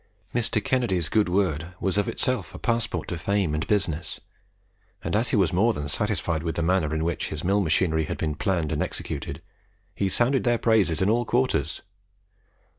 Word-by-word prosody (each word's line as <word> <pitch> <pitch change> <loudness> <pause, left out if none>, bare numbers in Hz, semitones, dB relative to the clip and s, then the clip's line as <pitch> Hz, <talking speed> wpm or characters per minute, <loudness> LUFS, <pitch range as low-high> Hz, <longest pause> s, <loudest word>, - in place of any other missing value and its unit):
Mr. 115 -3 +1
Kennedy's 115 - +1
good 105 -3 +2
word 90 -2 0
was 95 -2 0
of 105 0 +1
itself 130 0 -2
a - - -6
passport 115 -8 -1
to 90 - -3
fame 100 -3 0
and 75 +1 -2
business, 90 -6 -1 0.8
and - - -1
as 115 +3 +2
he - - +1
was 95 -6 +2
more 110 +6 +3
than 75 -6 -4
satisfied 80 +2 0
with 80 0 -3
the 85 - 0
manner 85 -3 +2
in 80 - -1
which 85 0 -1
his 75 - -5
mill 100 +3 +2
machinery 80 -2 +2
had - - -4
been 75 -1 -1
planned 85 -2 -1
and 75 - -1
executed, - - -4 0.5
he 95 - 0
sounded 125 +6 +2
their 120 -1 +3
praises 105 -9 +3
in 95 - +2
all 120 +2 +2
quarters. 120 - 0
95 Hz, 190 wpm, -25 LUFS, 80-110 Hz, 0.8 s, more